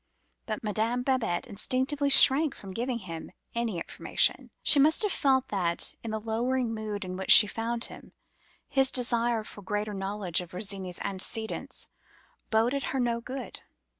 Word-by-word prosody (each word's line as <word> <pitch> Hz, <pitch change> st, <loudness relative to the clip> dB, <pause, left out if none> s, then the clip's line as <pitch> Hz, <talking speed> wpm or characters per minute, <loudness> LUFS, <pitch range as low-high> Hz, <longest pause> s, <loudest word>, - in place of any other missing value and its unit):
But 215 Hz, 0 st, -4 dB
Madame 220 Hz, +4 st, -1 dB
Babette 250 Hz, -10 st, 0 dB
instinctively 260 Hz, +7 st, -1 dB
shrank 275 Hz, +2 st, +6 dB
from 195 Hz, -, -10 dB
giving 240 Hz, +3 st, -2 dB
him 170 Hz, -7 st, -8 dB, 0.2 s
any 235 Hz, -5 st, -2 dB
information: 165 Hz, -, -1 dB
she 290 Hz, -, +6 dB
must 310 Hz, +8 st, +5 dB
have 415 Hz, -, 0 dB
felt 265 Hz, -4 st, +1 dB
that, 175 Hz, -4 st, -1 dB
in 230 Hz, -, -6 dB
the 220 Hz, 0 st, -3 dB
lowering 230 Hz, +2 st, -1 dB
mood 215 Hz, -2 st, -5 dB
in 185 Hz, 0 st, -6 dB
which 190 Hz, -, -6 dB
she -, -, +11 dB
found 230 Hz, +2 st, -3 dB
him, -, -, -6 dB, 0.6 s
his 270 Hz, -1 st, +2 dB
desire 235 Hz, -2 st, +1 dB
for 210 Hz, -, -11 dB
greater 210 Hz, +2 st, -3 dB
knowledge 195 Hz, -3 st, -2 dB
of 175 Hz, -, -10 dB
Virginie's 190 Hz, -1 st, -4 dB
antecedents 200 Hz, +3 st, -3 dB, 0.6 s
boded 240 Hz, +5 st, +1 dB
her 265 Hz, -, -3 dB
no 235 Hz, -1 st, -1 dB
good. 255 Hz, +1 st, -8 dB
225 Hz, 155 wpm, -28 LUFS, 200-255 Hz, 0.6 s, she